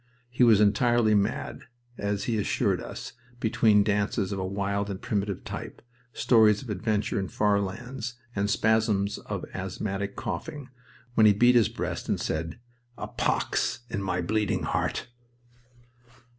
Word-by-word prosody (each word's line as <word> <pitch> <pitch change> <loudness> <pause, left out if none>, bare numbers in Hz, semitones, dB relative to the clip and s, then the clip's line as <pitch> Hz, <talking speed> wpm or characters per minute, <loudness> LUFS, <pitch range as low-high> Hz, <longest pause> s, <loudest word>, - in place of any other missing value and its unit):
He 125 0 +2
was 115 -4 +6
entirely 110 +2 +3
mad, 105 +2 -1 0.3
as 100 -2 -2
he 115 -3 0
assured 100 - 0
us, - - -7 0.3
between 110 -2 +4
dances 100 -1 0
of 100 - -2
a - - -2
wild 100 +1 -2
and 95 -1 -4
primitive 100 -2 -2
type, - - -7 0.3
stories 110 -4 +4
of 120 - -6
adventure 105 +1 -1
in 95 - -2
far 105 +2 +2
lands, 120 +5 -5 0.2
and 100 0 0
spasms 105 -2 +1
of - - -5
asthmatic 100 +1 -4
coughing, 150 -5 -5 0.4
when 110 -2 +6
he 105 - +6
beat 120 +5 +5
his 120 -4 +4
breast - - -4
and - - +1
said, 80 +4 -3 0.4
"A - - -4
pox - - 0
in 100 - -2
my 90 -2 -1
bleeding 105 +2 0
heart!" - - -1
105 Hz, 145 wpm, -27 LUFS, 100-110 Hz, 0.4 s, was